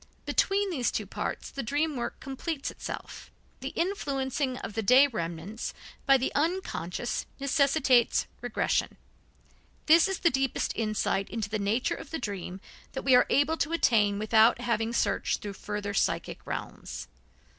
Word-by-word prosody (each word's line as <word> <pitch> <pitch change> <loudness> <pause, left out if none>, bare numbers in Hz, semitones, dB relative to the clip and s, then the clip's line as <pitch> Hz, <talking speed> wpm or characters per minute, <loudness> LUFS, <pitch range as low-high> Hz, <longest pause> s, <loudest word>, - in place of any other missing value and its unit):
Between 395 0 +2
these 255 -8 0
two 210 - -2
parts 195 - -4
the 275 - -4
dream 290 +5 0
work 240 -2 -4
completes 275 +2 -4
itself. - - -7 0.3
The - - -4
influencing 275 -7 -1
of 210 - -6
the 225 - -1
day 250 +6 +7
remnants 175 - -4 0.3
by 275 0 +7
the 260 - -2
unconscious 285 - -2
necessitates 275 -3 +3 0.2
regression. 245 -2 0 0.9
This 330 +3 +6
is 385 -1 -1
the 340 - +3
deepest 270 -1 0
insight 215 -3 0
into 215 -3 -4
the 215 - -1
nature 210 +5 +1
of 285 - -8
the 325 - -3
dream 195 - -5 0.3
that 265 - -4
we 265 - +4
are 250 - +6
able 300 +3 +3
to 315 +2 -1
attain 210 -10 +3
without 220 +3 +4
having 230 -2 0
searched 235 - 0
through 205 -1 -4
further 205 0 -4
psychic - - -1
realms. - - -6
250 Hz, 150 wpm, -28 LUFS, 215-285 Hz, 0.9 s, day